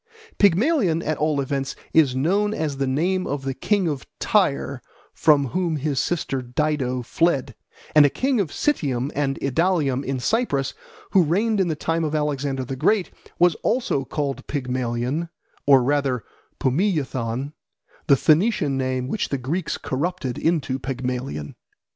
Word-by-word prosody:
Pygmalion, 200 Hz, -, +3 dB
at 155 Hz, -, -1 dB
all 150 Hz, -1 st, +1 dB
events, 135 Hz, 0 st, -2 dB, 0.2 s
is 145 Hz, -6 st, +4 dB
known 200 Hz, +10 st, +1 dB
as 150 Hz, -3 st, -2 dB
the 135 Hz, 0 st, 0 dB
name 180 Hz, +8 st, 0 dB
of 140 Hz, -1 st, -3 dB
the 135 Hz, 0 st, -2 dB
king 195 Hz, +7 st, +1 dB
of 145 Hz, -4 st, -2 dB, 0.2 s
Tyre 140 Hz, -, +1 dB, 0.3 s
from 145 Hz, -4 st, +3 dB
whom 175 Hz, 0 st, -1 dB
his 145 Hz, -1 st, -1 dB
sister 145 Hz, -6 st, -1 dB
Dido 130 Hz, -1 st, -1 dB
fled; 140 Hz, -2 st, 0 dB, 0.4 s
and 150 Hz, -, +8 dB
a 145 Hz, -, +5 dB
king 260 Hz, -, 0 dB
of 195 Hz, -, +1 dB
Citium 140 Hz, -, 0 dB
and 140 Hz, -1 st, -1 dB
Idalium 145 Hz, -2 st, +1 dB
in 135 Hz, -1 st, -2 dB
Cyprus, 140 Hz, -, 0 dB, 0.4 s
who 190 Hz, -, +6 dB
reigned 200 Hz, +7 st, +1 dB
in 190 Hz, -, +2 dB
the 160 Hz, -, -1 dB
time 165 Hz, +2 st, -1 dB
of 155 Hz, -1 st, -1 dB
Alexander 140 Hz, -3 st, -1 dB
the 135 Hz, +1 st, -4 dB
Great, 195 Hz, +8 st, +1 dB, 0.3 s
was 175 Hz, -1 st, +5 dB
also 230 Hz, -, 0 dB
called 140 Hz, +1 st, -3 dB
Pygmalion, 130 Hz, +3 st, -2 dB, 0.4 s
or 135 Hz, -3 st, +7 dB
rather 135 Hz, -4 st, 0 dB, 0.4 s
Pumiyathon, 135 Hz, -, -1 dB, 0.5 s
the 140 Hz, -4 st, +6 dB
Phoenician 160 Hz, -, +3 dB
name 130 Hz, -1 st, -1 dB
which 210 Hz, +9 st, -2 dB
the 140 Hz, -, -1 dB
Greeks 150 Hz, +7 st, -2 dB
corrupted 140 Hz, -2 st, -2 dB
into 140 Hz, -6 st, 0 dB
Pygmalion. 125 Hz, -, -4 dB
145 Hz, 150 wpm, -23 LUFS, 130-170 Hz, 0.5 s, and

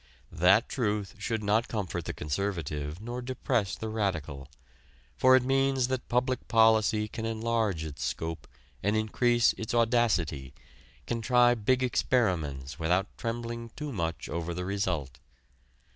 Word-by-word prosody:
That 95 Hz, +8 st, +4 dB
truth 105 Hz, -5 st, -2 dB
should 110 Hz, +1 st, -2 dB
not 110 Hz, +3 st, +2 dB
comfort 95 Hz, -6 st, -3 dB
the -, -, -2 dB
conservative 75 Hz, -2 st, -3 dB
nor 120 Hz, +3 st, -5 dB
depress 120 Hz, -5 st, -1 dB
the 110 Hz, -, -5 dB
radical. 85 Hz, -11 st, -2 dB, 0.7 s
For 130 Hz, 0 st, +6 dB
it 130 Hz, -, +4 dB
means 135 Hz, -1 st, +2 dB
that 130 Hz, -1 st, -3 dB
public 125 Hz, +1 st, 0 dB
policy 110 Hz, -2 st, +4 dB
can 110 Hz, -, -6 dB
enlarge 110 Hz, -5 st, -1 dB
its 75 Hz, -2 st, -6 dB
scope 80 Hz, 0 st, -4 dB, 0.3 s
and 105 Hz, +2 st, +1 dB
increase 120 Hz, +2 st, +3 dB
its 110 Hz, +1 st, -3 dB
audacity, 100 Hz, -, +1 dB, 0.5 s
can 115 Hz, -1 st, -2 dB
try 120 Hz, +1 st, +5 dB
big 125 Hz, +3 st, +1 dB
experiments 80 Hz, -, 0 dB
without 90 Hz, +4 st, 0 dB
trembling 115 Hz, 0 st, -4 dB
too 150 Hz, -1 st, -5 dB
much 85 Hz, -7 st, -3 dB
over 85 Hz, 0 st, -3 dB
the 90 Hz, +1 st, -3 dB
result. 90 Hz, -10 st, -2 dB
110 Hz, 135 wpm, -29 LUFS, 85-120 Hz, 0.7 s, For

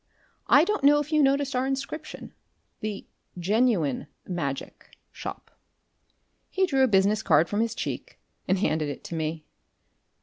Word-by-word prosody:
I 285 Hz, -, +7 dB
don't 420 Hz, -2 st, -1 dB
know 290 Hz, +1 st, +7 dB
if 295 Hz, +1 st, -4 dB
you 305 Hz, -1 st, +4 dB
noticed 275 Hz, 0 st, +2 dB
our 255 Hz, +1 st, +1 dB
inscription 270 Hz, +3 st, -5 dB, 0.5 s
the 210 Hz, -2 st, -5 dB, 0.3 s
Genuine 185 Hz, -, +1 dB, 0.2 s
Magic 145 Hz, -7 st, -5 dB
shop." -, -, -8 dB, 1.0 s
He 380 Hz, 0 st, +2 dB
drew 270 Hz, -7 st, +1 dB
a -, -, +5 dB
business 205 Hz, 0 st, +3 dB
card 160 Hz, -4 st, +4 dB
from 205 Hz, -, -2 dB
his 230 Hz, 0 st, 0 dB
cheek -, -, -5 dB, 0.3 s
and 190 Hz, -, +2 dB
handed 155 Hz, -6 st, 0 dB
it 145 Hz, -, -7 dB
to 170 Hz, -, -6 dB
me. 155 Hz, -1 st, -3 dB
215 Hz, 145 wpm, -26 LUFS, 170-275 Hz, 1.0 s, I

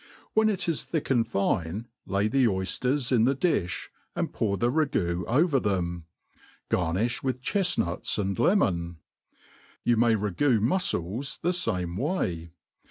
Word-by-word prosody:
When 220 Hz, 0 st, +4 dB
it 195 Hz, -4 st, -1 dB
is 165 Hz, -3 st, 0 dB
thick 160 Hz, -4 st, -3 dB
and 120 Hz, -3 st, +4 dB
£ne, 95 Hz, 0 st, -1 dB, 0.2 s
lay 100 Hz, +1 st, +1 dB
the 130 Hz, +3 st, +3 dB
oyfters 125 Hz, +7 st, -1 dB
in 115 Hz, -3 st, +4 dB
the 135 Hz, +2 st, +2 dB
di&, 130 Hz, -, +1 dB, 0.5 s
and -, -, -2 dB
pour 100 Hz, -3 st, 0 dB
the 120 Hz, +6 st, +1 dB
ragoo 90 Hz, -, 0 dB
over 145 Hz, +3 st, +3 dB
them« 85 Hz, -6 st, -2 dB, 0.6 s
Garnilh 95 Hz, +8 st, 0 dB
with 130 Hz, -1 st, -2 dB
chefnuts 180 Hz, -, 0 dB
and 100 Hz, -2 st, -1 dB
le 190 Hz, -, +4 dB
mon. 85 Hz, -, 0 dB, 0.9 s
You 120 Hz, -1 st, +3 dB
may 115 Hz, 0 st, +4 dB
ragoo 110 Hz, +5 st, +1 dB
mufcles 125 Hz, -, -1 dB
the 175 Hz, +2 st, +1 dB
fame 90 Hz, -, -1 dB
way. 95 Hz, -, -2 dB
115 Hz, 145 wpm, -27 LUFS, 90-140 Hz, 0.9 s, When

